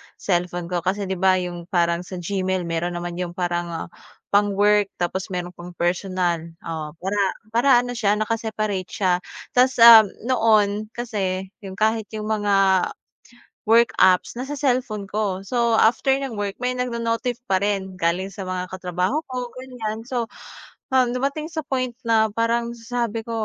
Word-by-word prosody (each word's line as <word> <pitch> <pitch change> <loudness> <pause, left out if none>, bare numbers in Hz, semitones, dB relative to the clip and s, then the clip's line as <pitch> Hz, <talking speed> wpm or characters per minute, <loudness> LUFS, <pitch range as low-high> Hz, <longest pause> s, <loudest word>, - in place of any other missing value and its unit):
cellphone 175 -1 -2
ko, 175 - +1
kasi 190 +4 -1
'di 190 -1 -3
ba 190 0 +4
yung 175 -2 -4
parang 170 -2 +1
sa 180 +1 -8
Gmail 185 +1 -2
meron 170 +1 -2
naman 175 0 -5
'yung 175 -1 -4
parang 175 -2 -3 0.4
pang-work 205 0 +3
tapos 180 +2 -2
meron 180 -1 -4
pang 175 0 -11
personal, 175 -1 -1 0.2
oh, 155 -2 -5
para 190 +5 -2 0.3
para 235 +5 +2
ano 245 - -5
siya 210 -4 +1
naka-separate 215 -3 -2
siya. 180 -3 +1 0.3
Ta's, 255 +1 +3
um, 225 -2 +11 0.2
noon 215 -4 +2
kasi 190 -5 -3
'yung 195 -3 -8
kahit 220 +1 +1
'yung 215 - -4
mga, 195 -3 +3 0.8
work 230 +1 +5
apps 185 -1 +4
nasa 265 +4 -5
cellphone 250 -7 0
ko. 195 -2 -2
So 235 0 +1
after 235 +4 +3
ng 275 -3 -4
work, 205 -2 -3
may 250 0 -1
nagno-notif 240 -1 -2
pa 190 -4 +1
rin, 195 -2 -1
galing 185 +2 -1
sa 195 - -7
mga 185 -1 -4
katrabaho 185 - -1
ko, 250 -1 -5
ganiyan. 245 -4 -5
So, 240 0 -2 0.7
um, 255 -2 +3
dumating 280 +4 -2
sa 320 -1 -4
point 255 -3 -2
na 225 -2 +3
parang 235 +1 0
sabi 230 -1 -3
ko, 230 - -10
205 Hz, 155 wpm, -23 LUFS, 180-235 Hz, 0.8 s, um